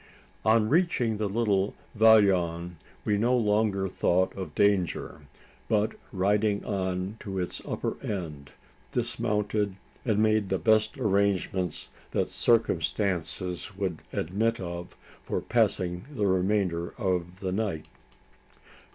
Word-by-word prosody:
On 110 0 +4
reaching 135 - +2
the 105 -1 -1
little 100 -2 +1 0.2
vallon, 90 -6 +4 0.3
we 105 -1 +2
no 125 +3 +3
longer 105 -3 +1
thought 95 0 +1
of 90 -6 -6
danger; 100 -6 +1 0.5
but, 105 0 +2 0.2
riding 100 +2 +1
on 95 +1 -2
to 95 -2 -5
its 90 -1 -3
upper - - -3
end, 75 -8 -5 0.4
dismounted, 105 -4 -1 0.3
and 110 -4 +1
made 110 -2 +2
the 95 - +1
best 110 +4 +2
arrangements 100 - 0 0.2
that - - +1
circumstances 95 -3 0
would 95 -5 -2
admit 110 +7 0
of 85 -1 -6 0.3
for - - -2
passing 95 -6 0
the 110 -8 -1
remainder 95 -2 +1
of 90 -4 -1
the 95 -2 -2
night. 95 -6 -2
100 Hz, 115 wpm, -28 LUFS, 90-110 Hz, 0.5 s, On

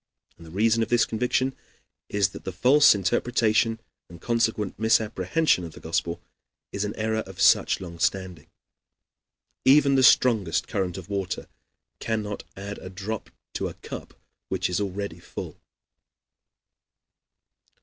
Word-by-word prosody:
And 85 - -14
the - - -11
reason 110 +6 +2
of 115 - -1
this 120 -1 +4
conviction 125 +3 0 0.5
is 100 -3 +2
that - - -11
the 95 - -4
false 130 +9 +5
interpretation 115 +4 +1 0.3
and 85 -1 -12
consequent 110 -2 -1
misapprehension 110 - +2
of 80 -2 -8
the - - -12
Gospel 85 +1 -2 0.5
is 100 - -2
an 105 0 -4
error 110 0 -1
of 95 - -11
such - - +4
long 85 -2 -9
standing. 90 -4 -1 1.2
Even 140 +1 +5
the 135 - +4
strongest 110 -9 +4
current 95 -7 -2
of - - -8
water 100 -2 -3 0.5
cannot 105 -2 -3 0.2
add 100 +1 -6
a 95 - -9
drop 100 +3 -5 0.2
to - - -2
a - - -8
cup - - -9 0.3
which - - -1
is 90 - 0
already 100 -3 -4
full. - - -8
105 Hz, 140 wpm, -25 LUFS, 95-115 Hz, 1.2 s, false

